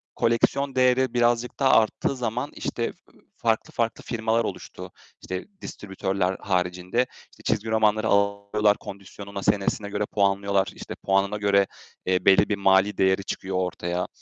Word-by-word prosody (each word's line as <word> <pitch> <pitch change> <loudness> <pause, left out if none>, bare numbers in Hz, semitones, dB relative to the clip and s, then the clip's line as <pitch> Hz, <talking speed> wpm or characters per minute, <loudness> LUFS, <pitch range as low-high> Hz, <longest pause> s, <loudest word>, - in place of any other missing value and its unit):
koleksiyon 130 +4 +1
değeri 130 -1 +3
birazcık 120 +1 +1
daha 135 -1 +4
arttığı 110 +5 -2
zaman, 125 +3 -3
işte, 115 - -4 0.3
ııı, - - -24
farklı, 115 -1 0
farklı 115 -1 -1
firmalar 115 0 0
oluştu. - - -7 0.3
İşte, 95 0 -5 0.2
distribütörler 95 -1 -2
haricinde, 90 +5 0 0.3
işte, - - -19
çizgi 110 +2 -1
romanları 110 0 +2
alıyorlar, 100 +1 +2
kondisyonuna, 100 0 -8
senesine 100 +1 0
göre 105 0 -1
puanlıyorlar, 100 -1 +1
işte, - - -8
puanına 100 +2 0
göre, 100 -1 +3 0.4
eee, 90 0 +1
belli 95 +2 +5
bir 105 - +1
mali 95 +1 +3
değeri 95 +1 +2
çıkıyor 95 0 -4
ortaya. 90 -1 -2
100 Hz, 140 wpm, -25 LUFS, 95-115 Hz, 0.4 s, belli